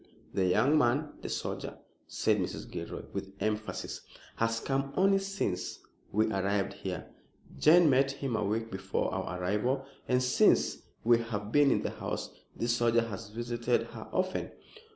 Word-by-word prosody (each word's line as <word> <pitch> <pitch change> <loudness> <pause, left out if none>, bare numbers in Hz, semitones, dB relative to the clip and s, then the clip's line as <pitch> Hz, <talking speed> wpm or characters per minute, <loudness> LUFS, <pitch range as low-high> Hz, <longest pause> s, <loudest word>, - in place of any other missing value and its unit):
"The 95 -1 +2
young 140 +12 +4
man 140 +4 +1
the - - -5
soldier," - - -4 0.3
said - - +1
Mrs. - - -3
Gilroy, - - -5
with 95 0 -5
emphasis 110 0 -2 0.4
"has 115 0 +1
come 135 +2 -1
only 195 +1 +5
since 195 - -2 0.3
we 110 +2 +3
arrived 100 0 0
here. 90 -3 -6 0.5
Jane 170 +2 +7
met 135 0 +4
him 135 -3 -3
a - - 0
week 110 +3 -1
before 95 0 -2
our 90 - -3
arrival, 105 +9 0 0.2
and 125 0 +2
since 125 - +4 0.2
we 120 0 +5
have 105 -3 -4
been 145 +1 +5
in - - +2
the - - -1
house - - -4 0.2
this 115 0 +1
soldier 115 -1 +2
has 105 +1 -6
visited 120 +2 0
her 115 -1 -9
often." 185 0 -1
115 Hz, 155 wpm, -31 LUFS, 105-135 Hz, 0.5 s, Jane